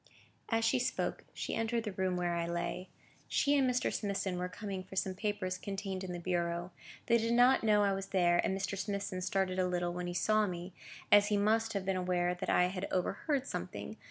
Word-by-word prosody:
As 225 Hz, -1 st, +2 dB
she 255 Hz, +3 st, +3 dB
spoke, 245 Hz, -, -2 dB
she -, -, -4 dB
entered 225 Hz, 0 st, 0 dB
the 210 Hz, -, -3 dB
room 185 Hz, -1 st, -1 dB
where 175 Hz, -1 st, 0 dB
I 170 Hz, 0 st, -1 dB
lay. 170 Hz, +2 st, -3 dB, 0.4 s
She 285 Hz, 0 st, +2 dB
and 270 Hz, -2 st, +3 dB
Mr. 250 Hz, 0 st, 0 dB
Smithson 195 Hz, -3 st, -2 dB
were 180 Hz, 0 st, -2 dB
coming 195 Hz, 0 st, -5 dB
for 190 Hz, +1 st, -12 dB
some 190 Hz, 0 st, 0 dB
papers 190 Hz, -2 st, -2 dB
contained 195 Hz, -1 st, -4 dB
in 185 Hz, -, -5 dB
the 175 Hz, -, -4 dB
bureau. 175 Hz, 0 st, -1 dB, 0.3 s
They 235 Hz, 0 st, +4 dB
did 230 Hz, +1 st, 0 dB
not 245 Hz, +2 st, +5 dB
know 210 Hz, -2 st, +4 dB
I 200 Hz, -1 st, +3 dB
was 195 Hz, 0 st, -4 dB
there, 175 Hz, -3 st, +3 dB
and 190 Hz, -, 0 dB
Mr. 195 Hz, +1 st, -2 dB
Smithson 195 Hz, -1 st, -3 dB
started 190 Hz, 0 st, 0 dB
a 185 Hz, -, +2 dB
little 175 Hz, -1 st, -1 dB
when 180 Hz, 0 st, -4 dB
he 175 Hz, -, -4 dB
saw 215 Hz, +4 st, +3 dB
me, 175 Hz, 0 st, -6 dB, 0.4 s
as 205 Hz, 0 st, +7 dB
he 210 Hz, -1 st, +2 dB
must 225 Hz, +2 st, +2 dB
have 200 Hz, -2 st, -2 dB
been 190 Hz, -1 st, 0 dB
aware 180 Hz, -1 st, +1 dB
that 180 Hz, +1 st, -4 dB
I -, -, +4 dB
had 185 Hz, +1 st, -3 dB
overheard 255 Hz, -, 0 dB
something. -, -, -5 dB
190 Hz, 215 wpm, -33 LUFS, 180-210 Hz, 0.4 s, as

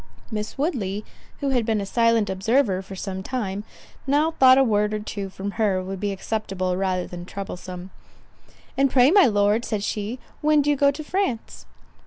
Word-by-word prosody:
Miss 210 Hz, +2 st, -4 dB
Woodley, 215 Hz, -, -2 dB, 0.4 s
who 280 Hz, -, 0 dB
had 250 Hz, -3 st, +2 dB
been 220 Hz, -1 st, 0 dB
a 200 Hz, -, -3 dB
silent 230 Hz, 0 st, +2 dB
observer 190 Hz, +1 st, +1 dB
for 195 Hz, 0 st, -10 dB
some 190 Hz, 0 st, -5 dB
time, 205 Hz, -3 st, -3 dB, 0.4 s
now 295 Hz, +4 st, +3 dB
thought 260 Hz, -4 st, +6 dB
a 270 Hz, -, +6 dB
word 210 Hz, -3 st, +1 dB
or -, -, -2 dB
two 205 Hz, -2 st, -5 dB
from 195 Hz, +1 st, -5 dB
her 200 Hz, -3 st, +2 dB
would 190 Hz, 0 st, -5 dB
be 205 Hz, 0 st, -1 dB
acceptable 195 Hz, -2 st, -2 dB
rather 185 Hz, -1 st, -1 dB
than 175 Hz, -1 st, -8 dB
troublesome. 185 Hz, -1 st, -7 dB, 0.8 s
"And 275 Hz, 0 st, +3 dB
pray, 255 Hz, +2 st, +5 dB
my 395 Hz, -4 st, +7 dB
Lord," 205 Hz, +1 st, +2 dB
said 210 Hz, -4 st, -2 dB
she, 210 Hz, +4 st, -3 dB, 0.2 s
"when 300 Hz, -1 st, +4 dB
do 295 Hz, -, +2 dB
you -, -, +2 dB
go 280 Hz, 0 st, +4 dB
to 285 Hz, +2 st, -4 dB
France?" 300 Hz, -, -3 dB
210 Hz, 185 wpm, -24 LUFS, 195-260 Hz, 0.8 s, my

